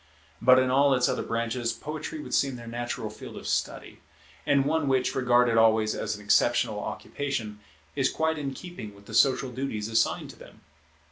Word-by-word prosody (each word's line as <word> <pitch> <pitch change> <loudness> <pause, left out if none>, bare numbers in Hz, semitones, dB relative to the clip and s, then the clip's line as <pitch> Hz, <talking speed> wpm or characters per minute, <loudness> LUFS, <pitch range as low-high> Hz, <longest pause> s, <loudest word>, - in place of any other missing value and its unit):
But 130 +2 +7
in 130 0 +2
all 140 +1 +4
its 125 - +2
other - - -1
branches, 115 +1 -2
poetry 155 - -6
would - - -8
seem 135 -2 +2
their 120 -1 -9
natural 120 +1 -4
field - - -10
of - - -8
study; - - -3 0.5
and 140 -2 +3
one 155 0 0
which, 130 -1 +1
regarded 125 -2 +3
always 110 -1 +4
as 105 - -3
an 105 - -11
exceptional 105 - +2
occupation, 115 -7 -4 0.4
is 135 -2 +2
quite 160 -1 -1
in 135 -2 -4
keeping 150 - -9
with 100 0 -18
the - - -11
social 135 -1 +3
duties 115 -4 -4
assigned 115 - 0
to - - -18
them. - - -15
130 Hz, 185 wpm, -27 LUFS, 115-140 Hz, 0.5 s, But